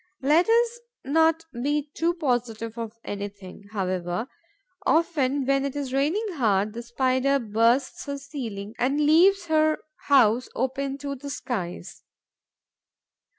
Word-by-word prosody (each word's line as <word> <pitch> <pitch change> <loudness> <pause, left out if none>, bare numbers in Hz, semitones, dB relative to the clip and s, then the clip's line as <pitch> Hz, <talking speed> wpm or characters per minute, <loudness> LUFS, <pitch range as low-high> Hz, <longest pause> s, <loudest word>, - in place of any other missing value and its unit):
Let 315 +8 +4
us 470 +1 +3 0.3
not 325 +3 +3
be 290 +4 -1
too 340 +1 0
positive 235 - -2
of 230 -1 -6
anything, 200 -1 -7
however: 185 0 -2 0.6
often, 290 -5 +1
when 275 0 +2
it 280 -1 -3
is 275 -3 -4
raining 305 +11 +1
hard, 210 -4 +2
the 235 - -5
Spider 260 +3 +1
bursts 230 +4 +1
her 280 0 -3
ceiling 230 -8 -6
and 270 +4 +1
leaves 360 +5 +5
her 310 -1 +3 0.3
house 250 -3 +4
open 270 +2 -2
to 280 0 -4
the 280 +1 -8
skies. 185 -10 -5
270 Hz, 125 wpm, -25 LUFS, 225-295 Hz, 0.6 s, leaves